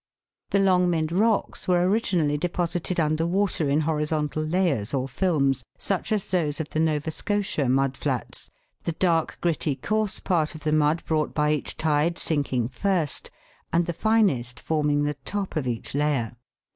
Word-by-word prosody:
The - - +2
Longmynd 180 -4 +2
rocks 210 +4 +1
were 180 -1 +3
originally 185 -8 +1
deposited 175 +2 -2
under 155 +1 +1
water 180 -4 +1
in 145 +3 +2
horizontal 150 -1 -1
layers 155 - 0
or 130 0 -1
films, 140 -4 +1
such 195 +2 -2
as 210 -3 0
those 160 -5 0
of 160 - -3
the 155 - -1
Nova 155 -1 +1
Scotia 195 -8 -1
mud 135 +1 +2
flats, - - -4 0.3
the 170 - -2
dark, 165 -1 +1
gritty, 160 -4 0
coarse 215 +8 -1
part 165 -4 0
of 155 - -9
the 155 0 0
mud 155 +2 +2
brought 155 -1 0
by 150 0 +2
each 150 -2 -1
tide 155 +2 +1
sinking 135 -6 0
first, 170 +1 -1 0.4
and 170 +1 +2
the 170 - -2
finest 155 - +1
forming 150 -2 +1
the 145 -1 -1
top 200 +3 -3
of 145 -5 -1
each 120 -2 -4
layer. 140 -5 0
155 Hz, 160 wpm, -25 LUFS, 145-180 Hz, 0.4 s, were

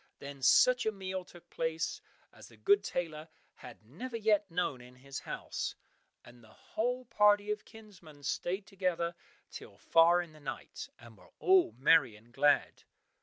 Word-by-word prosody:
Then 140 -1 -9
such 250 - +5
a - - +2
meal 190 -2 -5
took 175 -1 -17
place 165 - -2 0.3
as - - -14
the - - -18
good 405 0 +3
tailor 160 -2 -4 0.3
had 95 - -13
never 230 - -6
yet 210 -2 +2
known 165 -7 -2
in 125 +1 -15
his 135 +1 -8
house, - - -5 0.5
and 120 0 -16
the - - -17
whole 245 - -3
party 210 -2 +3
of 210 0 -4
kinsmen 180 -10 -15
stayed 185 +7 -2
together 180 -4 -2 0.4
till - - -11
far 170 +2 +4
in 165 -2 -15
the 155 - -16
night, 135 -3 -7
and 115 -1 -15
were - - -19
all 375 -1 +4
merry 130 -2 +4
and 115 +3 -20
glad. 145 +2 +2
170 Hz, 165 wpm, -32 LUFS, 140-210 Hz, 0.5 s, such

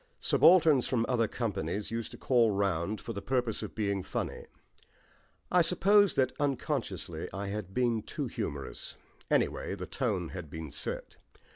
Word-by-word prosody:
Subalterns 160 -7 +5
from 115 -3 +1
other 115 -3 +2
companies 105 -2 -3
used 115 -1 -3
to - - -10
call 120 -3 +3
round 100 0 0
for 115 - -6
the 100 - -5
purpose 125 -4 -1
of - - -6
being 100 -3 0
funny; - - -4 1.0
I 180 - +6
suppose 195 +4 +4
that 130 -1 +3
unconsciously 130 - -2
I 100 +1 -4
had 100 -2 -4
been 120 -3 +2
too - - -4
humorous 70 -2 -5 0.3
anyway, - - +1
the 90 -2 -6
tone 100 - -2
had 90 -5 -7
been 80 -1 -7
set. 75 - -5
110 Hz, 150 wpm, -31 LUFS, 95-130 Hz, 1.0 s, I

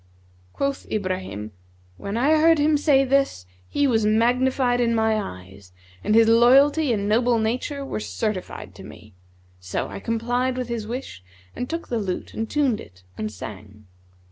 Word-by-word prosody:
(Quoth 275 0 -3
Ibrahim), 185 - -3 0.5
When 200 +3 -4
I 300 +6 +3
heard 325 0 +5
him 300 +1 +3
say 285 -2 +3
this, 270 - +1 0.2
he 285 - +1
was 225 -5 +2
magnified 245 +3 +2
in 230 -1 +2
my 220 0 +2
eyes 90 - -8 0.3
and 215 - +2
his 225 0 +6
loyalty 270 +6 +5
and 205 -3 -1
noble 235 +3 +3
nature 250 +6 -2
were 270 - -4
certified 215 -3 -4
to - - -12
me; 105 -1 -13 0.5
so 90 0 -4
I - - -7
complied 245 +4 -1
with 250 -1 -3
his 230 -3 -4
wish 240 - -6 0.3
and 250 - -4
took 330 +1 -5
the 235 - -1
lute 190 -4 -4
and 225 0 -4
tuned 275 -7 +1
it, 90 +1 -16
and 105 +1 -4
sang. 105 +1 -10
230 Hz, 165 wpm, -23 LUFS, 195-260 Hz, 0.5 s, his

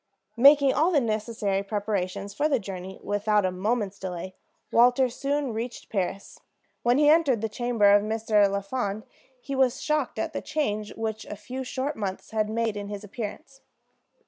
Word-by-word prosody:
Making 280 +2 +7
all 320 +4 +3
the 325 -6 +3
necessary 215 -4 -1
preparations 200 -1 -3
for 295 +9 +1
the 275 - +3
journey 190 -3 -7
without 205 0 +1
a 185 - +1
moment's 205 +1 -1
delay, 185 0 -5 0.4
Walter 250 +2 +5
soon 275 +1 -2
reached 230 +2 -6
Paris. 195 -1 -3 0.4
When 240 +2 +3
he 295 0 +4
entered 295 -7 +4
the 225 - 0
chamber 225 -2 +2
of 205 - +6
Mr. 215 -1 +2
Lafond 200 +1 -2 0.4
he 275 +2 -5
was 265 -1 +2
shocked 300 -3 -1
at - - -2
the - - -3
change 215 -9 -2
which 220 -1 -3
a - - -6
few 255 +6 -6
short 265 +3 -3
months 195 -3 -5
had 215 -1 0
made 225 -1 -1
in 205 -1 -5
his 205 0 -6
appearance. 230 +6 -7
220 Hz, 170 wpm, -26 LUFS, 205-260 Hz, 0.4 s, Making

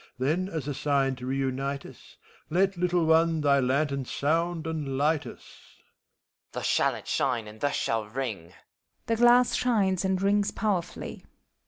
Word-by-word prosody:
Then, 160 +9 0
as 160 -6 -4
a 145 - -2
sign 135 -1 +1
to 125 0 -7
reunite 135 +1 -2
us. - - -15 0.3
Let, 190 +4 +2
little 175 -1 +1
one, 160 0 +3
thy 140 -1 +4
lantern 140 +1 0
sound 165 +5 -1
and 150 -5 -3
light 150 +2 +1
us! - - -11 0.3
HOMUNCULUS. - - -39
Thus - - -4
shall - - +2
it - - -10
shine, 115 -3 0
and 105 +1 -12
thus 145 - 0
shall 115 -1 -1
ring 110 -7 -4
I - - -21 0.5
{The 230 - 0
glass 240 +1 +5
shines 200 -7 +1
and 190 -1 0
rings 200 +1 +2
powerfully.) 195 -5 -3
155 Hz, 165 wpm, -27 LUFS, 135-185 Hz, 0.5 s, glass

